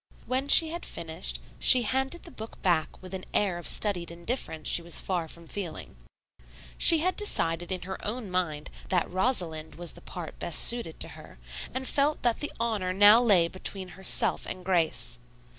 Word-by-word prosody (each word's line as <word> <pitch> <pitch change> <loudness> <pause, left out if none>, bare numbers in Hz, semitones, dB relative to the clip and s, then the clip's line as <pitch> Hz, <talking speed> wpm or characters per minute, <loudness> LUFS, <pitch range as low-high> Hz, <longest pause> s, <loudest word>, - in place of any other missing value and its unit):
When 260 +2 -1
she 320 +2 +9
had 340 +2 -6
finished 165 +1 -3 0.2
she 250 -1 +7
handed 265 +8 -2
the 340 - -12
book 220 -4 -10
back 170 -4 0
with 185 0 -10
an 185 -1 -6
air 190 -4 +1
of 175 - -7
studied 185 -5 0
indifference 170 -2 -4
she - - +2
was 170 0 0
far 175 -4 -3
from 170 +1 -11
feeling. 180 - -7 0.8
She 330 - +6
had 370 +2 0
decided 175 - +3
in 185 -2 -3
her 190 +1 -7
own 215 -2 -4
mind 160 -5 -3 0.2
that 180 -2 +1
Rosalind 180 -7 -1
was 175 -1 -5
the - - -14
part - - -9
best - - +1
suited 235 -9 0
to - - 0
her, - - -14 0.3
and 260 +1 -4
felt 290 +3 +1
that 240 -2 +1
the 295 - -3
honor 210 -6 -1
now 205 +4 +7
lay 195 -8 +4
between 185 +1 -5
herself 190 +1 0
and 185 -1 -7
Grace. 160 -9 0
190 Hz, 180 wpm, -27 LUFS, 170-240 Hz, 0.8 s, she